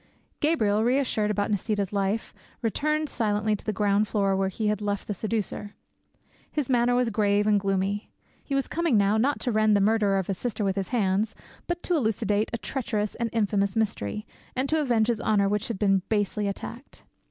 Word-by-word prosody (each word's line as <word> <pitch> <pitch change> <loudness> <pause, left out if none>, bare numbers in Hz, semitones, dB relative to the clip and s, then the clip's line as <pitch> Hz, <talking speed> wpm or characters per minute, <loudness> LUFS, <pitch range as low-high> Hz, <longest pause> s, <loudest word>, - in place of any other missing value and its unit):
Gabriel, 220 -10 +2
reassured 245 -4 +1
about 210 0 0
Nisida's 205 -1 -1
life, 200 +2 -1 0.3
returned 305 +7 0
silently 215 -3 0
to - - -9
the 215 - -1
ground 205 +1 +2
floor 195 -2 +1
where 190 0 +1
he 215 +3 -4
had 210 0 +1
left 205 -1 -2
the 210 - -1
seducer. 210 0 -3 0.8
His 285 -4 -1
manner 245 0 +3
was 245 -2 +2
grave 205 -1 +2
and 210 -1 +4
gloomy; 195 +1 -1 0.3
he 275 - -3
was 275 - 0
coming 335 -8 +1
now 200 +1 +3
not 270 +6 +1
to 250 - 0
rend 215 -1 +4
the - - +2
murderer 205 -1 +3
of 190 - 0
his 190 -1 -3
sister 235 -3 -2
with 190 -1 0
his 195 -2 -2
hands, 205 -2 +1 0.3
but 345 0 -3
to 360 - 0
elucidate 220 - +1
a 230 - -2
treacherous 215 -4 -2
and 235 -1 -2
infamous 200 -3 +1
mystery, 215 - -1 0.3
and 260 +2 0
to 315 0 +2
avenge 240 -6 +2
his 230 -1 -1
honour 200 -2 +2
which 210 0 0
had 230 - -3
been 195 -1 +3
basely 210 -1 0
attacked. 235 +6 -7
210 Hz, 195 wpm, -26 LUFS, 200-235 Hz, 0.8 s, and